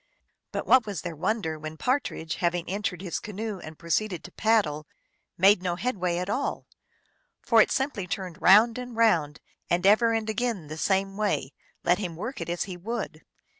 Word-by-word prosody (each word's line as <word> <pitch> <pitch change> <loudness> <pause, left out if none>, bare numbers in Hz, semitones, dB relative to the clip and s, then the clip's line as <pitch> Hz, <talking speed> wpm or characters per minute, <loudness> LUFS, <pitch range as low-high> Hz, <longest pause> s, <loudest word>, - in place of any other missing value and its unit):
But - - -3
what 255 -4 +5
was 200 -5 -4
their 170 -2 -5
wonder 160 -2 -1
when 155 +1 -7
Partridge, 250 - -1
having 175 -1 0
entered 200 -1 -3
his 180 - -3
canoe 210 -1 -5
and 155 -2 -10
proceeded 175 +2 -1
to - - -10
paddle, 170 -9 +1 0.5
made 195 +1 +5
no 180 -2 -1
headway 185 -4 -1
at 180 +1 -2
all; 260 +7 -2 0.7
for - - +5
it - - +2
simply 265 -9 -1
turned 180 -1 -5
round 225 +5 +6
and 245 -2 -7
round, 165 -10 +2 0.3
and 175 +2 +1
ever 220 +3 +5
and 225 -1 -1
again 220 -8 -2
the 155 - -6
same 195 +1 0
way, 200 -10 -1 0.3
let 175 +2 +3
him 180 -5 -4
work 230 +10 -5
it - - -4
as 175 0 -1
he 185 -2 -7
would. 205 -4 -5
195 Hz, 180 wpm, -27 LUFS, 170-220 Hz, 0.7 s, round